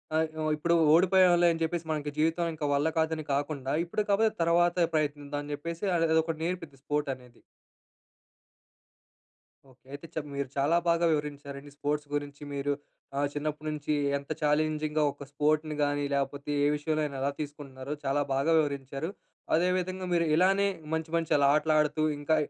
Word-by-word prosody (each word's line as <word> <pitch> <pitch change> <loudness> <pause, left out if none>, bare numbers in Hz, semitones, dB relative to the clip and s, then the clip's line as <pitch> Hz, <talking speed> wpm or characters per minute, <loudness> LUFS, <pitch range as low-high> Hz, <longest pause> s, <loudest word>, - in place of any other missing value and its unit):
ఆహ్, 160 0 +2 0.3
ఇప్పుడు 170 +3 +1 0.2
ఓడిపోయాం‌లే 180 0 +5
అని 165 - -6
చెప్పేసి 165 0 -2
మనకి 150 -1 -2
జీవితం 165 +2 +1
ఇంక 155 - -7
వల్ల 140 +2 +2
కాదని 160 0 0
కాకుండా, 140 -1 -2
ఇప్పుడు 175 +5 -2
కాకపోతే 215 +2 +3
తర్వాత 175 +1 +3
ప్రయత్నిద్దాం 145 -1 -1
అని 145 - -7
చెప్పేసి 170 +5 -5
అది 165 0 +2
అదొకటి 160 0 +1
నేర్పింది 165 -5 -4
స్పోర్ట్ 145 -1 -1
అనేది. 125 -2 -16 2.3
ఓకె. 130 0 -24
అయితే 155 +2 -6
మీరు 140 -2 -2
చాలా 145 +5 +3
బాగా 170 0 +3
వివరించారండి 145 -1 -5
స్పోర్ట్స్ 145 0 -2
గురించి. 145 0 -4
మీరు 140 0 -1 0.5
ఆహ్, 145 0 +2
చిన్నప్పటి 150 +1 -3
నుంచి 150 0 -2 0.2
ఎంత 140 +2 -9
ఛాలెంజింగ్‌గా 155 0 +1
ఒక 140 - -11
స్పోర్ట్‌ని 150 +1 +1
కానీ 145 0 0
లేకపోతే 140 +1 -2
ఏ - - +4
విషయంలో 155 +1 -1
అయినా, 140 -2 -5
ఎలా 140 +1 +1
తీసుకుంటున్నారో 145 -2 -6
చాలా 140 +1 +1
బాగా 140 +4 +1
వివరించారు. 140 +1 -2 0.5
అదే 175 +3 +3
విధంగా 185 +1 -4
మీరు 170 -1 +3
ఇలానే 195 +4 +4 0.3
మంచి, 160 0 -2
మంచి 165 -1 -3
అలా 140 -1 +4
ఆటలు 155 +1 +2
ఆడుతూ 150 0 +1 0.2
ఇంకా 145 +2 +2
150 Hz, 155 wpm, -29 LUFS, 145-165 Hz, 2.3 s, ఓడిపోయాం‌లే